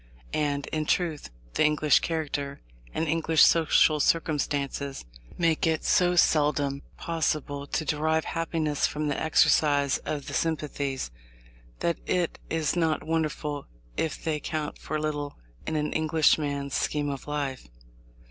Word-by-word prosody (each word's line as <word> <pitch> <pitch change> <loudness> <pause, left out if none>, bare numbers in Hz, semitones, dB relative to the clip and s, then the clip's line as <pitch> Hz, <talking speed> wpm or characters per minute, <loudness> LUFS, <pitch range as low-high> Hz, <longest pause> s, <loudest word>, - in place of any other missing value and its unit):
And, 145 -2 0
in 155 -1 -1
truth, 165 -5 0 0.2
the - - +2
English 150 0 +4
character, 145 -3 -3 0.3
and 160 - -1
English 160 0 +4
social 155 -1 +5
circumstances, 140 - 0 0.3
make 165 -2 +2
it 160 -1 0
so 180 0 +3
seldom 145 -4 +2 0.2
possible 150 -3 -2
to 155 - -2
derive 160 +2 +1
happiness 160 -3 0
from 150 0 -2
the 145 - -2
exercise 145 -3 +3
of 145 -2 -4
the - - -7
sympathies, 145 - -2 0.7
that 170 - 0
it 175 -2 0
is 160 -1 0
not 165 -3 +1
wonderful 155 -2 -2 0.3
if 160 -2 -2
they 155 -2 -1
count 150 0 -4
for 155 - -3
little 145 -1 -3 0.3
in 160 - -1
an 150 0 -1
Englishman's 150 -3 +2
scheme 145 -1 0
of 140 +1 -7
life. 140 - -3
150 Hz, 130 wpm, -27 LUFS, 145-160 Hz, 0.7 s, social